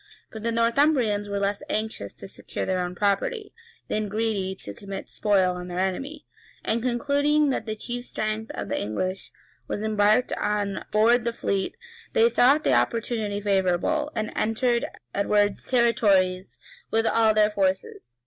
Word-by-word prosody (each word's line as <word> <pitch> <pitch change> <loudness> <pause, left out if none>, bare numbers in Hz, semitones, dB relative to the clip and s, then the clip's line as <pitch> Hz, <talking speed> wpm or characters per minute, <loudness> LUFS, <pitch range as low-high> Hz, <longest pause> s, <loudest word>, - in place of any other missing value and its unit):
But 220 - -8
the 230 +1 0
Northumbrians 230 -3 +2
were 200 - -2
less 200 0 -1
anxious 215 - -3
to - - -10
secure - - -6
their 185 -1 0
own 180 0 -3
property, 210 - -1 0.3
than 215 -1 -2
greedy 205 -3 -1
to 100 - -7
commit 195 - -8
spoil 195 -4 +2
on 180 0 -7
their 175 0 -6
enemy; 270 +12 -3 0.4
and, 230 +1 +1
concluding 285 +4 +2
that 230 - -3
the 215 - -2
chief 245 +3 -5
strength 215 0 -3
of 100 - -4
the - - -2
English 185 - -3 0.4
was 210 - -3
embarked 215 +2 +2
on 205 -1 -1
board 230 +3 +4
the 235 - 0
fleet, 195 -4 -2 0.4
they 465 -1 +5
thought 285 - +4
the - - +3
opportunity 210 - 0
favorable, 200 - +1
and 215 -1 -2
entered 235 +2 +1 0.3
Edward's 205 0 +1
territories 200 -7 +2 0.3
with 225 0 +1
all 225 -1 +3
their 215 0 +4
forces. 190 - -2
215 Hz, 155 wpm, -25 LUFS, 195-235 Hz, 0.4 s, they